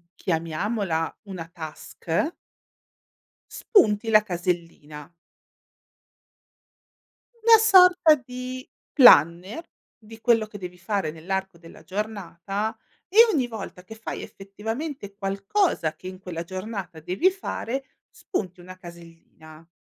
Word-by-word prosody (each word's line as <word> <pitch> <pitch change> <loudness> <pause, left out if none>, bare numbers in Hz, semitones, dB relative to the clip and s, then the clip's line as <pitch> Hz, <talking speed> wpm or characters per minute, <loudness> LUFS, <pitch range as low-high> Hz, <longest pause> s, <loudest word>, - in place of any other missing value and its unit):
chiamiamola 165 +1 -2
una 180 -4 -7
task 165 - -4 1.2
spunti 225 - +2
la 215 -1 +6
casellina. 170 -5 -4 2.3
Una 460 -1 +8
sorta 365 -6 +6
di 255 -1 -8 0.3
planner 185 - +6 0.3
di 225 0 -14
quello 225 -2 +3
che 210 - -10
devi 180 -2 -8
fare 190 -3 -2
nell'arco 190 +3 -4
della 165 -1 -15
giornata 200 +1 -4 0.3
e 395 - -5 0.2
ogni 265 -7 +1
volta 210 -5 -8
che 220 +4 -11
fai 225 - -6
effettivamente 215 +4 -6
qualcosa 195 - 0
che 185 - -11
in 185 0 -8
quella 170 -3 -6
giornata 185 -2 -6
devi 185 - +2
fare, 270 -8 -4 0.3
spunti 185 - -5
una 185 +1 -11
casellina. 165 -2 -14
195 Hz, 105 wpm, -25 LUFS, 170-230 Hz, 2.3 s, Una